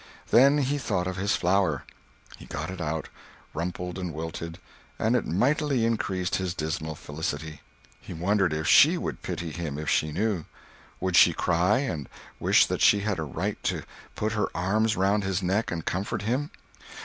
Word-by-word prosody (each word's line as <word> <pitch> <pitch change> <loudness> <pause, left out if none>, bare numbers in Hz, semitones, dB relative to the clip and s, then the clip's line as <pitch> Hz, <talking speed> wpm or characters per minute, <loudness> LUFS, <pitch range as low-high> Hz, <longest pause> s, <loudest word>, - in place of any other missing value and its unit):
Then 140 +4 +6
he 145 0 0
thought 90 -8 -1
of 95 0 -3
his 100 +2 +1
flower. 90 -5 +1 0.5
He - - -13
got 75 +5 -4
it 95 -1 -6
out, 80 0 -3 0.4
rumpled 90 +2 -4
and 90 -2 -3
wilted, 80 +1 -6 0.4
and 115 +3 +1
it 125 - 0
mightily 135 - +1
increased 95 -5 0
his 90 -2 -3
dismal 80 0 -3
felicity. 75 +1 -5 0.4
He - - -11
wondered 95 +2 +1
if 80 +1 -2
she - - +7
would - - -4
pity 85 -2 -4
him 75 -4 -4
if 75 0 -3
she 75 - +1
knew? 95 0 -1 0.5
Would - - -1
she - - +7
cry, 90 +5 +2
and 80 - -4 0.3
wish - - +5
that - - -3
she 105 - +5
had 100 -4 -1
a - - -1
right 70 - -3
to - - -1 0.3
put 110 +1 -1
her 105 -2 0
arms 105 +5 +1
around 100 +1 +2
his 95 0 -1
neck 95 +5 0
and 80 -2 -4
comfort 100 +2 -2
him? 130 +7 -1
90 Hz, 175 wpm, -27 LUFS, 80-105 Hz, 0.5 s, she